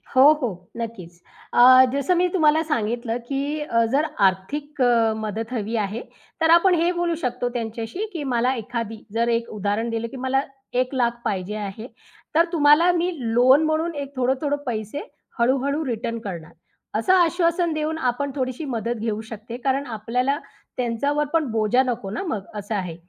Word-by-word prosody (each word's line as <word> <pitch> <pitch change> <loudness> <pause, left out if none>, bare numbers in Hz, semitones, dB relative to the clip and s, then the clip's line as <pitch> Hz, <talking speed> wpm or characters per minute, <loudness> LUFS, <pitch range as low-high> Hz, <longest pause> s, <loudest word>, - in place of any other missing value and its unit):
हो, 270 +3 +8
हो. 180 -8 -4
नक्कीच. 185 -7 -7 0.3
अ, 255 +1 +8
जसं 280 +6 +1
मी 360 +1 +3
तुम्हाला 315 -3 +4
सांगितलं 235 -5 -1
की 280 +3 -2
अ, 230 -6 +1
जर 285 +3 +2 0.2
आर्थिक 280 +11 -4
अ, 230 -3 +4
मदत 220 +2 -4
हवी 225 -1 -2
आहे, 215 +1 -2 0.4
तर 320 - +4
आपण 350 +2 +6
हे 345 +1 +3
बोलू 345 -1 -1
शकतो 245 -1 -1
त्यांच्याशी 230 - -4
की 325 -4 -4
मला 245 +2 +2
एखादी, 230 -1 -5
जर 230 +1 +1
एक 230 0 0
उदाहरण 210 +3 -1
दिलं, 230 0 -2
की 265 - -9
मला 260 +1 +1 0.4
1,00,000 245 -2 -1
पाहिजे 195 +1 -2
आहे, 210 +2 -6 0.5
तर 335 +1 +6
तुम्हाला 310 +2 +5
मी 350 +1 0 0.2
लोन 260 +5 +6
म्हणून 315 +1 0
एक 280 -1 -6
थोडं-थोडं 265 +3 0
पैसे 220 +2 -3 0.4
हळू-हळू 275 +5 +1
रिटर्न 230 -2 -3
करणार. 175 -7 -7 0.4
असं 225 +12 +3
आश्वासन 345 -1 +2
देऊन 310 +1 -2
आपण 280 +3 -2
थोडीशी 260 +2 -3
मदत 240 -3 -2
घेऊ 220 -1 -1
शकते 225 +2 -7
कारण 275 +1 +1
आपल्याला 250 +6 0 0.4
त्यांच्यावर 270 +5 0
पण 325 -2 +3
बोजा 220 +3 +2
नको 235 -6 -3
ना 215 - -4
मग 205 - -3
असं 210 +1 -4
आहे. 180 -5 -3
245 Hz, 165 wpm, -23 LUFS, 225-295 Hz, 0.5 s, हो